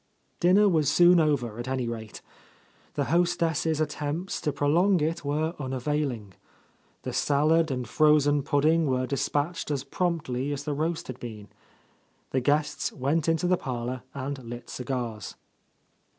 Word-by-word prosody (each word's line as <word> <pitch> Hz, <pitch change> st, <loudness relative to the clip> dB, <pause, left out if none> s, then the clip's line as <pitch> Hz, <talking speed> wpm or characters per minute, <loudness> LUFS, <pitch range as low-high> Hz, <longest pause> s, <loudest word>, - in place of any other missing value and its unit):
Dinner 190 Hz, +4 st, +5 dB
was 160 Hz, -7 st, +2 dB
soon 175 Hz, 0 st, +6 dB
over, 125 Hz, -8 st, 0 dB
at 120 Hz, -, -5 dB
any 130 Hz, -2 st, -1 dB
rate. 110 Hz, -2 st, -7 dB, 0.7 s
The 145 Hz, -, +1 dB
host 175 Hz, 0 st, +2 dB
ess' 160 Hz, -1 st, 0 dB
attempts 155 Hz, +4 st, -2 dB
to 150 Hz, -, 0 dB
prolong 170 Hz, +7 st, +3 dB
it 160 Hz, +2 st, -1 dB
were 155 Hz, +3 st, -1 dB
unavailing. 130 Hz, -5 st, -2 dB, 0.7 s
The -, -, -4 dB
salad 155 Hz, +3 st, +2 dB
and 125 Hz, -3 st, -3 dB
frozen 145 Hz, +1 st, +4 dB
pudding 155 Hz, +3 st, +2 dB
were 130 Hz, -1 st, +1 dB
dispatched 145 Hz, +5 st, -2 dB
as 140 Hz, -3 st, -1 dB
promptly 145 Hz, -4 st, -2 dB
as 145 Hz, 0 st, -3 dB
the 150 Hz, 0 st, -2 dB
roast 160 Hz, +3 st, -2 dB
had 130 Hz, -1 st, -8 dB
been. 105 Hz, -4 st, -8 dB, 0.8 s
The 130 Hz, -, +1 dB
guests 145 Hz, +3 st, 0 dB
went 150 Hz, +4 st, 0 dB
into 165 Hz, +1 st, +1 dB
the 180 Hz, 0 st, +3 dB
parlour 125 Hz, -2 st, -4 dB
and 140 Hz, 0 st, -4 dB
lit 120 Hz, +1 st, -8 dB
cigars. 120 Hz, -5 st, -4 dB
145 Hz, 145 wpm, -27 LUFS, 130-160 Hz, 0.8 s, soon